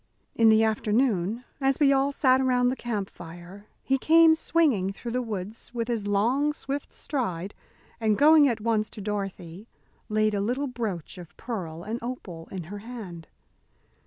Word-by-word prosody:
In 225 -1 +5
the 220 0 +5
afternoon, 220 -1 +1 0.2
as 270 0 +1
we 280 -2 +5
all 275 +1 +2
sat 260 -2 +3
around 250 -1 +2
the 255 - -1
camp 215 -6 -3
fire, 175 +5 -12 0.2
he 270 0 +1
came 325 +3 +6
swinging 300 - +1
through 235 +4 -7
the 250 +1 0
woods 220 +1 -6
with 230 0 -2
his 220 -4 -2
long, 245 +9 +2
swift 280 -1 -5
stride, 200 - -3 0.5
and 215 -2 +1
going 305 0 +7
at 230 -2 -2
once 215 -1 0
to 220 - -10
Dorothy 195 -2 -5 0.4
laid 215 0 +2
a 200 - 0
little 250 +7 -1
brooch 215 - -5
of 175 -3 -13
pearl 175 -9 -5
and 220 +4 -4
opal 190 -9 -7
in 185 -2 -5
her 200 +6 -8
hand. 200 -8 -9
225 Hz, 165 wpm, -26 LUFS, 195-255 Hz, 0.5 s, going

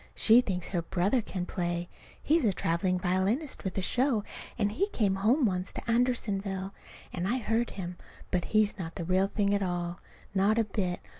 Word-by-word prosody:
She 230 +2 +6
thinks 180 -7 -3
her 175 -3 -1
brother 190 +8 +1
can 185 -4 -4
play. 175 -1 -2 0.4
He's 320 +2 +3
a 215 - +4
traveling 180 +1 0
violinist 190 - 0
with 190 -1 -4
a 190 - 0
show; 250 -1 +2 0.3
and 205 -3 +1
he 395 - 0
came 200 - +1
home 240 +8 +3
once 185 -3 -1
to - - -7
Andersonville. 205 -5 0 0.4
And 180 0 -2
I 245 - +1
heard 230 0 0
him. 180 -2 -5 0.3
But 180 -2 0
he's 215 -1 +2
not 165 -2 -5
the 170 - -4
real 185 +2 +2
thing 200 0 +1
at 200 - +1
all. 175 -1 -2 0.3
Not 200 +3 +3
a 230 - +4
bit. 195 -4 -2
195 Hz, 190 wpm, -29 LUFS, 180-225 Hz, 0.4 s, She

